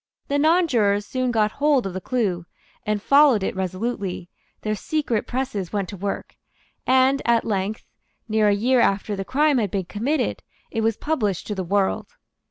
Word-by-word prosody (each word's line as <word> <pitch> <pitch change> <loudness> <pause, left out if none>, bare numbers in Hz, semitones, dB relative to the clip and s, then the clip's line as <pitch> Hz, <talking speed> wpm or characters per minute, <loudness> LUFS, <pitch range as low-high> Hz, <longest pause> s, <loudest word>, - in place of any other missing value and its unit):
The 285 0 +1
nonjurors 255 - +3
soon 255 +3 -1
got 215 -3 +2
hold 285 -3 +2
of 190 - -4
the 185 - -5
clue, 185 -8 -1 0.4
and 210 -1 +1
followed 275 -2 +5
it - - -2
resolutely; 190 -1 -3 0.3
their 215 - -1
secret 240 0 -2
presses 245 -8 -3
went 200 -4 -2
to 205 - -7
work; 200 +1 -5 0.5
and 260 +2 +4
at 235 -1 +2
length, 205 0 -2 0.4
near 215 -1 +2
a - - +5
year 245 +5 +2
after 205 -1 +1
the 195 - -3
crime 285 +4 +2
had 210 -3 0
been 190 0 -2
committed, 240 - -1 0.3
it 225 - -1
was 225 -1 +1
published 215 - -1
to 210 - -3
the 190 -2 -3
world. 195 +2 0
215 Hz, 175 wpm, -23 LUFS, 200-260 Hz, 0.5 s, followed